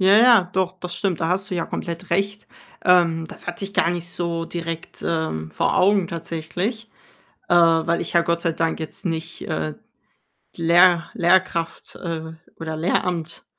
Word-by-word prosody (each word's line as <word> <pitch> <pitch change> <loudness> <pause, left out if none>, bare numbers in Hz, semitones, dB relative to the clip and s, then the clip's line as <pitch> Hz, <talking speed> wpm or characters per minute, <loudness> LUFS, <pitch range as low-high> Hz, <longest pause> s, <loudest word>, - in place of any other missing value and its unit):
Ja, 190 +2 +6
ja, 230 -3 +7
doch, 185 -1 -1
das 180 0 -5
stimmt. 180 -1 -1
Da 165 - +1
hast 195 +3 0
du - - -2
ja 165 - -1
komplett 170 +2 -5
recht. 200 +1 -1 0.4
Ähm, 170 -3 +4
das - - -11
hatte 175 +3 -4
ich 200 - -7
gar 170 - +3
nicht 175 -1 -3
so 170 -1 -2
direkt, 165 -1 -6
ähm, 160 - -2
vor 80 - 0
Augen 195 -1 +4
tatsächlich, 170 +7 -4 0.6
äh, - - +3
weil 165 0 +4
ich - - -4
ja 170 - +5
Gott 170 0 0
sei 170 -1 0
Dank 165 +1 -1
jetzt 160 -1 -7
nicht, 165 0 -4
äh, 75 -1 -3 0.8
die - - -6
Lehr 175 +1 +5
Lehrkraft, 175 -1 +1
äh, 160 -2 -5 0.3
oder 160 -1 -4
Lehramt 170 0 -1
170 Hz, 170 wpm, -22 LUFS, 165-185 Hz, 0.8 s, ja